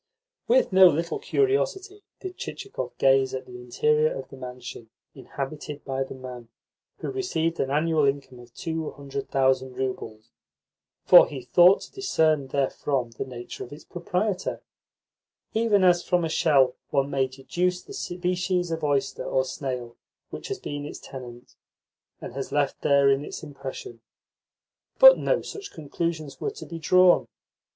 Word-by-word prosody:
With - - +3
no 190 0 +9
little 170 +1 0
curiosity 410 -1 0 0.2
did 375 -1 -6
Chichikov 405 - -6
gaze 135 -1 +3
at 130 - -6
the 125 0 -10
interior 150 +5 +1
of 135 -1 -6
the - - -11
mansion 125 -3 -9 0.2
inhabited 145 +1 -7
by 135 0 -1
the 135 - -9
man 125 -2 -9 0.5
who - - -5
received 170 - -1
an 135 - 0
annual 155 +1 +2
income 135 -2 -2
of 120 -1 -15
two 160 -3 -3
hundred 140 -1 -7
thousand 130 -1 +1
roubles; 115 -4 -5 0.7
for - - +9
he 135 -3 -7
thought 175 +8 +5
to - - -11
discern 160 - +1
therefrom 135 -2 -1
the 115 - -5
nature 120 -2 -8
of 120 - -12
its 145 +2 -10
proprietor, 180 +3 -3 0.9
even 220 -3 +3
as 175 -1 +4
from 180 -2 +1
a - - -2
shell 140 -6 +3
one 140 -1 0
may 135 -1 +1
deduce 175 +8 -2
the - - -11
species 180 - -2
of 160 -1 -3
oyster 140 -2 0
or 130 0 0
snail 130 -3 -5 0.3
which - - -7
has 400 - -3
been 145 - -6
its 145 - -7
tenant, 120 -3 -11 0.7
and - - -8
has 135 0 -5
left 145 -1 0
therein 140 -1 +3
its - - -8
impression. 135 -5 -8 1.0
But - - +9
no - - 0
such 405 -1 -8
conclusions 155 0 -4
were - - -1
to 430 +1 -10
be 165 -1 -7
drawn. 180 +2 +5
145 Hz, 155 wpm, -25 LUFS, 130-180 Hz, 1.0 s, no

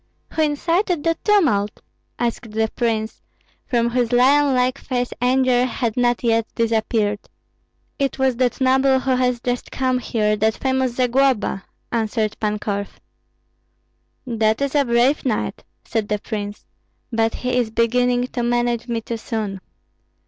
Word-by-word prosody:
"Who 320 - 0
incited 335 +3 +1
that 330 -1 -1
tumult?" 265 - +2 0.4
asked 235 -1 -2
the 220 +1 0
prince, 225 -2 -1 0.5
from 235 -3 +1
whose 245 -1 0
lion 270 +3 +4
like 255 +1 +1
face 245 -1 -2
anger 250 0 +3
had 235 -3 -2
not 245 -1 +1
yet 230 -1 +2
disappeared. 220 -2 0 0.8
"It 275 -1 0
was 265 -2 +1
that 255 +1 0
noble 265 0 +3
who 265 - -1
has 250 -1 +1
just 245 0 -2
come 255 -1 0
here, 215 -3 0
that 220 +1 +1
famous 260 -2 0
Zagloba," 250 -5 +1 0.3
answered 220 -2 -1
Pan 210 -1 0
Korf. 200 -1 -4 1.3
"That 220 -3 +1
is 280 -1 0
a 285 -2 +3
brave 240 +4 +2
knight," 240 -5 -2 0.2
said 220 -2 -2
the 210 - 0
prince, 205 -1 -6 0.5
"but 225 0 +1
he 250 0 -2
is 245 -3 +1
beginning 245 +2 +2
to 245 - -3
manage 240 0 0
me 230 -1 -2
too 230 +1 -4
soon." 215 -4 -4
240 Hz, 145 wpm, -21 LUFS, 220-260 Hz, 1.3 s, lion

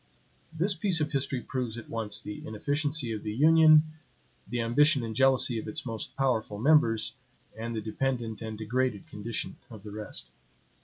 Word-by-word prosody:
This 170 +5 +1
piece 175 -1 +2
of 150 0 -1
history 135 -2 -1
proves 125 -4 -3
at 120 - -8
once 110 -3 -2
the 105 - -7
inefficiency 145 +4 -1
of 110 -2 -4
the 105 0 -4
union, 155 +2 +7 0.6
the 120 - -3
ambition 135 +3 +3
and 110 -1 -5
jealousy 130 -2 +3
of - - -7
its 105 - -5
most 115 -3 -4
powerful 120 -6 0
members, 115 -3 +3 0.4
and 115 +1 -5
the 110 - -2
dependent 115 0 -2
and 110 -1 -5
degraded 110 0 -1
condition 110 +3 -5
of 110 -4 -11
the 105 - -8
rest. 105 0 -6
120 Hz, 165 wpm, -29 LUFS, 110-145 Hz, 0.6 s, union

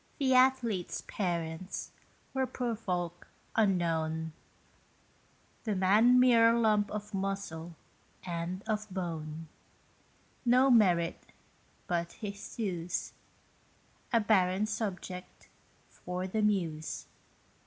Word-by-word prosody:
The 265 -3 +2
athlete's 255 -7 +3
parents 170 -1 -3 0.4
were 265 -1 +1
poor 245 -3 -2
folk 175 -5 -3 0.3
unknown; 160 -6 +1 1.3
The 215 -3 -1
man 215 +7 +5
mere 230 -2 +6
lump 215 -3 +3
of 210 0 -6
muscle 190 -4 -3 0.5
and 175 +2 -4
of 215 -1 -2
bone 165 -4 -5 1.0
No 255 +2 +5
merit 180 -7 +3 0.6
but 170 -1 -1
his 200 -2 -7
thews, 180 -6 -3 1.0
A 230 - +5
barren 195 -2 +3
subject 190 -4 -5 0.4
for 180 +1 -5
the 215 +4 -1
muse. 170 -7 -1
195 Hz, 90 wpm, -31 LUFS, 175-220 Hz, 1.3 s, mere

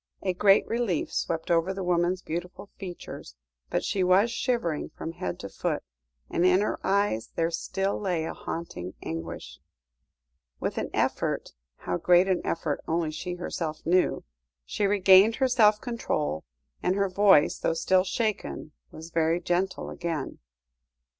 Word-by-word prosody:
A 185 -2 +1
great 195 +2 +5
relief 230 -8 -1
swept 165 +1 -2
over 170 +3 +2
the 195 - -4
woman's 180 +1 +1
beautiful 180 +4 -6
features, 175 - -8 0.3
but - - -1
she 195 - 0
was 190 +6 +4
shivering 235 - -1
from 165 - -6
head 90 - -5
to - - -5
foot, - - -3 0.4
and 170 - 0
in 185 +1 +5
her 210 - -1
eyes 195 - +1
there 165 0 +1
still 195 +4 -2
lay 180 -6 -1
a - - -4
haunting 95 - -6
anguish. 80 -2 -6 1.0
With - - -2
an - - -3
effort - - -1 0.2
how 90 - -3
great 180 - +4
an 185 -2 +1
effort 155 -3 -2
only 165 -1 0
she 175 +3 -5
herself 165 -3 -4
knew 180 +2 +2 0.4
she 200 - 0
regained 195 +2 +6
her 265 - +2
self 215 -4 +4
control, 155 - -2 0.4
and 180 - +1
her 200 0 +2
voice, 190 -5 +4
though 165 - 0
still 185 +2 +3
shaken, 195 - -2 0.2
was 160 +1 -11
very 165 +1 +2
gentle 180 +2 -1
again. 165 -5 -4
180 Hz, 150 wpm, -27 LUFS, 165-195 Hz, 1.0 s, regained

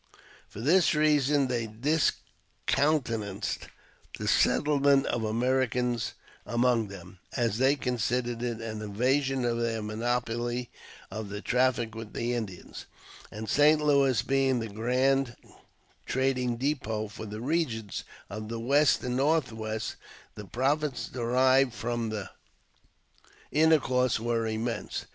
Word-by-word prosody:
For 105 - -9
this 165 +6 +4
reason 150 -2 +3
they 120 -3 -1
discountenanced 120 -3 -1 0.5
the - - -4
settle 145 -1 +3
ment 140 -1 +4
of 120 - -1
Americans 125 +1 0 0.3
among 120 -2 +1
them, 95 -1 -11 0.2
as 115 -3 0
they 135 +2 +4
considered 120 -2 -1
it 120 -2 -3
an 110 -1 -5
invasion 130 +5 0
of 120 -1 0
their 115 -2 -1
monopoly 120 +2 -2 0.4
of 110 -2 -5
the 105 +1 -5
traffic 125 -1 +1
with 115 -1 -8
the 120 +1 -1
Indians; 105 -7 -6 0.4
and 110 +1 -7
St. 150 +6 +5
Louis 140 -4 +3
being 135 -2 +2
the 115 -1 -4
grand 125 +4 +1 0.7
trading 130 -2 0
depot 115 -5 -1
for 110 +1 -8
the 105 +1 -6
regions 120 - -2 0.2
of 105 +1 -7
the 115 0 -4
West 140 +4 +3
and 125 0 -2
North 140 0 +2
west, 110 0 -4 0.4
the 105 - -9
profits 135 - -1
derived 130 +1 +2
from 120 -1 -2
the 105 -3 -5 1.2
intercourse 135 -6 +3
were 115 0 0
immense. 115 +2 -3
120 Hz, 125 wpm, -28 LUFS, 110-135 Hz, 1.2 s, St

